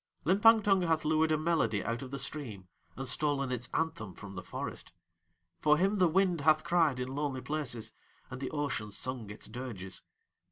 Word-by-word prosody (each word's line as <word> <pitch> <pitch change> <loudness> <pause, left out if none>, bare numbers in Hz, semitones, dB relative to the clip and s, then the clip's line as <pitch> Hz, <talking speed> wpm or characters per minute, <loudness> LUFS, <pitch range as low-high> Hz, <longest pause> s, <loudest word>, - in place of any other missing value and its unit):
Limpang 215 +5 +6
Tung 195 -2 +4
hath 160 -3 +1
lured 155 +1 +3
a 155 - +3
melody 155 - +1
out 115 +2 -2
of 130 - -7
the 140 - -4
stream 125 -9 -5 0.3
and 135 0 -5
stolen 140 0 +1
its 125 -1 -3
anthem 110 - -2
from 100 -2 -9
the 90 - -5
forest; - - -6 0.7
for 150 0 +4
him 195 +4 +2
the 180 - +6
wind 180 -1 +2
hath 155 +1 +4
cried 165 -6 +2
in 125 0 -3
lonely 140 -2 -2
places 125 -8 -4 0.4
and 130 +1 -6
the 130 - -2
ocean 140 -8 -2
sung 120 0 -2
its 105 - -7
dirges. 110 -6 -7
145 Hz, 185 wpm, -32 LUFS, 120-160 Hz, 0.7 s, Limpang